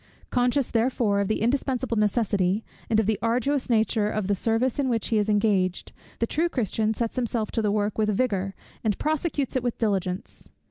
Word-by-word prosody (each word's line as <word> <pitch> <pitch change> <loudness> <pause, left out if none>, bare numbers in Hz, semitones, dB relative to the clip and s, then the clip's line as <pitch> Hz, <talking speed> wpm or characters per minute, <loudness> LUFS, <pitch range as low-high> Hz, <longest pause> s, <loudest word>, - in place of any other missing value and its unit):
Conscious 250 +2 +1
therefore 225 -3 +1
of 200 - +1
the 215 +1 0
indispensable 260 0 0
necessity, 210 -2 +1 0.3
and 220 - +3
of 220 - +2
the 215 -1 0
arduous 250 +4 0
nature 220 -2 +2
of 215 -2 -2
the 200 - +1
service 225 +6 0
in 270 -2 +1
which 230 -3 -1
he 220 - +2
is 210 +1 0
engaged, 205 -4 +1 0.3
the 230 - +1
true 325 +8 0
Christian 220 - 0
sets 230 +2 -2
himself 235 -3 -1
to 225 - 0
the 210 -2 +1
work 210 0 -1
with 215 -1 +2
vigour, 195 -3 0 0.3
and 215 -3 +1
prosecutes 305 -3 -1
it 255 - +2
with 240 -1 -2
diligence. 195 -3 -2
220 Hz, 190 wpm, -26 LUFS, 205-245 Hz, 0.3 s, and